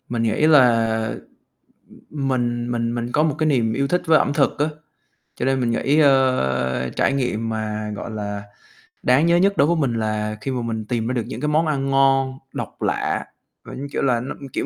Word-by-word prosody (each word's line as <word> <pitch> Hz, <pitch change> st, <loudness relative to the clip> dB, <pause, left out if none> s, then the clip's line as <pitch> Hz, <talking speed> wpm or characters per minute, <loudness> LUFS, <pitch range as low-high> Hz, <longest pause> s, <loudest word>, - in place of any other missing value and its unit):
Mình 120 Hz, -1 st, -1 dB
nghĩ 115 Hz, +7 st, +2 dB
là, 115 Hz, -6 st, +3 dB, 0.8 s
ừm, 140 Hz, -3 st, -6 dB
mình 120 Hz, -2 st, -1 dB
mình 115 Hz, 0 st, -1 dB
mình 120 Hz, 0 st, -3 dB
có 150 Hz, -, +3 dB
một 155 Hz, -3 st, +1 dB
cái 155 Hz, -, +1 dB
niềm 120 Hz, -7 st, +2 dB
yêu 140 Hz, +4 st, 0 dB
thích 180 Hz, +3 st, +1 dB
với 160 Hz, -1 st, +6 dB
ẩm -, -, 0 dB
thực 145 Hz, -2 st, +1 dB
á, 145 Hz, -, +2 dB, 0.7 s
cho -, -, -3 dB
nên 135 Hz, 0 st, +1 dB
mình 120 Hz, -2 st, 0 dB
nghĩ, 140 Hz, +5 st, +1 dB
ơ, 65 Hz, -, +2 dB
trải -, -, +2 dB
nghiệm 120 Hz, -4 st, -1 dB
mà, 110 Hz, -1 st, -3 dB
gọi 110 Hz, -, -6 dB
là, 105 Hz, -2 st, -5 dB, 0.6 s
đáng 130 Hz, +5 st, +4 dB
nhớ 170 Hz, 0 st, +4 dB
nhất 195 Hz, +3 st, +2 dB
đối 140 Hz, -, +4 dB
với 170 Hz, -, +2 dB
mình 135 Hz, -6 st, 0 dB
là 110 Hz, -1 st, -2 dB
khi 135 Hz, -, -3 dB
mà 125 Hz, -2 st, -2 dB
mình 115 Hz, -2 st, -4 dB
tìm 115 Hz, 0 st, -2 dB
ra 125 Hz, -, -1 dB
được 120 Hz, -3 st, -1 dB
những 130 Hz, -, -6 dB
cái 150 Hz, -, -1 dB
món 155 Hz, +2 st, +2 dB
ăn 135 Hz, -3 st, -1 dB
ngon, 135 Hz, -1 st, +2 dB
độc -, -, -7 dB
lạ, -, -, -1 dB, 0.4 s
và -, -, -9 dB
như 140 Hz, +2 st, -6 dB
kiểu -, -, -2 dB
là 125 Hz, -4 st, +2 dB
nó, 125 Hz, +3 st, -5 dB
ưm, 140 Hz, -, -9 dB
kiểu, -, -, -3 dB
125 Hz, 220 wpm, -21 LUFS, 115-140 Hz, 0.8 s, với